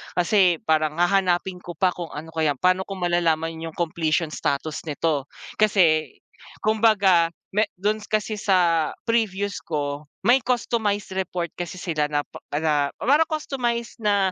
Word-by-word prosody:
kasi 180 Hz, 0 st, +4 dB
parang 155 Hz, -1 st, +1 dB
hahanapin 180 Hz, +1 st, +1 dB
ko 175 Hz, -1 st, -9 dB
pa 180 Hz, +3 st, +2 dB
kung 175 Hz, -1 st, -6 dB
ano 160 Hz, +2 st, -7 dB
kaya 160 Hz, -3 st, 0 dB
paano 185 Hz, +6 st, +1 dB
ko 195 Hz, -, -5 dB
malalaman 165 Hz, -3 st, 0 dB
yung 165 Hz, -1 st, -7 dB
completion 165 Hz, -1 st, 0 dB
status 140 Hz, -1 st, -2 dB
nito, 145 Hz, -2 st, -1 dB, 0.3 s
kasi 175 Hz, -7 st, +4 dB, 0.6 s
kumbaga 205 Hz, -6 st, +4 dB, 0.2 s
me 210 Hz, -, +4 dB, 0.2 s
dun 210 Hz, +3 st, 0 dB
kasi 215 Hz, 0 st, -1 dB
sa 175 Hz, -6 st, +2 dB, 0.2 s
previews 205 Hz, -3 st, 0 dB
ko, 145 Hz, -1 st, -3 dB, 0.2 s
may 250 Hz, +1 st, +5 dB
customized 215 Hz, -5 st, -1 dB
report 180 Hz, -2 st, -2 dB
kasi 175 Hz, 0 st, -5 dB
sila 160 Hz, -5 st, -1 dB
na 145 Hz, 0 st, +1 dB, 0.3 s
na 145 Hz, -1 st, +1 dB
parang 290 Hz, +7 st, +4 dB
customized 245 Hz, -7 st, -2 dB
na 200 Hz, -2 st, +2 dB
180 Hz, 140 wpm, -24 LUFS, 160-205 Hz, 0.6 s, may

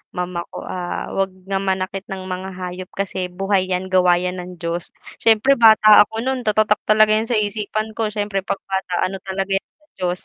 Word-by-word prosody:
mama 180 Hz, -1 st, -3 dB
ko -, -, -8 dB
ah, 180 Hz, -1 st, -4 dB
wag 195 Hz, 0 st, 0 dB, 0.2 s
na 195 Hz, 0 st, -1 dB
manakit 190 Hz, 0 st, -2 dB
ng 190 Hz, -1 st, -5 dB
mga 185 Hz, +1 st, -5 dB
hayop 180 Hz, 0 st, -6 dB
kasi 190 Hz, -2 st, -2 dB
buhay 190 Hz, +1 st, 0 dB
yan 185 Hz, +1 st, -2 dB
gawa 180 Hz, -1 st, +5 dB
yan 180 Hz, 0 st, -3 dB
ng 180 Hz, 0 st, -9 dB
Diyos 170 Hz, +1 st, -3 dB, 0.3 s
siyempre 225 Hz, +5 st, +5 dB
bata 220 Hz, -2 st, +8 dB
ako 225 Hz, +1 st, -5 dB
nun 260 Hz, -1 st, -1 dB
tatatak 215 Hz, -1 st, +2 dB
talaga 215 Hz, 0 st, +5 dB
yun 220 Hz, +1 st, +1 dB
sa 235 Hz, -, +2 dB
isipan 215 Hz, +1 st, -2 dB
ko. 225 Hz, -, 0 dB
Syempre 205 Hz, -1 st, -2 dB
pag 195 Hz, +1 st, -3 dB
bata 190 Hz, -1 st, -3 dB
ano 190 Hz, +1 st, -4 dB
talaga 195 Hz, 0 st, -4 dB
yan 195 Hz, -, -1 dB
sa 305 Hz, -1 st, -32 dB
Diyos 180 Hz, 0 st, -1 dB
195 Hz, 200 wpm, -20 LUFS, 185-215 Hz, 0.3 s, bata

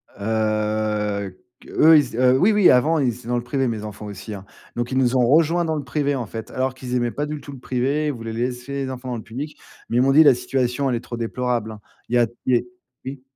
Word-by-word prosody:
Heu, 105 Hz, -2 st, -1 dB, 0.2 s
q -, -, -16 dB
eux, 160 Hz, 0 st, +7 dB
ils 130 Hz, -6 st, 0 dB
a 130 Hz, 0 st, +5 dB
oui, 185 Hz, +12 st, +4 dB
oui, 205 Hz, -3 st, +5 dB
avant, 150 Hz, +6 st, +4 dB
ils 130 Hz, -, +2 dB
étaient 120 Hz, -2 st, -13 dB
dans 120 Hz, -, 0 dB
le 120 Hz, -, -3 dB
privé, 135 Hz, +1 st, -1 dB
mes 110 Hz, -3 st, -3 dB
enfants 105 Hz, 0 st, -8 dB
aussi, 105 Hz, +1 st, -7 dB
hein. 100 Hz, -1 st, -8 dB, 0.3 s
Donc 120 Hz, +1 st, -3 dB
ils 130 Hz, -, 0 dB
nous 130 Hz, -1 st, +2 dB
ont 125 Hz, -, +4 dB
rejoint 165 Hz, +4 st, +3 dB
dans 160 Hz, -1 st, -1 dB
le 150 Hz, -, -3 dB
privé, 145 Hz, +2 st, -1 dB
en 125 Hz, -3 st, -3 dB
fait, 110 Hz, +2 st, -8 dB
alors 130 Hz, 0 st, -1 dB
qu'ils 130 Hz, -1 st, -5 dB
aimaient 120 Hz, -1 st, 0 dB
pas 145 Hz, -, -2 dB
du 150 Hz, -1 st, -5 dB
tout 140 Hz, -, -10 dB
le 135 Hz, -, -10 dB
privé, 135 Hz, +5 st, -1 dB
ils 145 Hz, -, 0 dB
voulaient 115 Hz, -1 st, -6 dB
laisser 125 Hz, +3 st, -3 dB
les -, -, -5 dB
enfants 130 Hz, 0 st, -7 dB
dans 120 Hz, -, -3 dB
le 110 Hz, -, -8 dB
public, 140 Hz, +7 st, -7 dB, 0.3 s
mais 120 Hz, -, 0 dB
ils -, -, +5 dB
m'ont 135 Hz, +1 st, +4 dB
dit: 155 Hz, +3 st, +7 dB
«La 140 Hz, -5 st, +6 dB
situation, 125 Hz, +2 st, -1 dB
elle 125 Hz, -, +1 dB
est 115 Hz, -, -1 dB
trop 120 Hz, -, -7 dB
déplorable 120 Hz, -1 st, -2 dB
hein». 105 Hz, -1 st, -11 dB, 0.3 s
Il 120 Hz, -, 0 dB
y 120 Hz, -, +5 dB
a 120 Hz, -, +3 dB, 0.2 s
il 130 Hz, -, +2 dB
y -, -, +6 dB
est 120 Hz, -, -4 dB, 0.4 s
oui. 135 Hz, 0 st, -6 dB
125 Hz, 275 wpm, -22 LUFS, 115-140 Hz, 0.4 s, eux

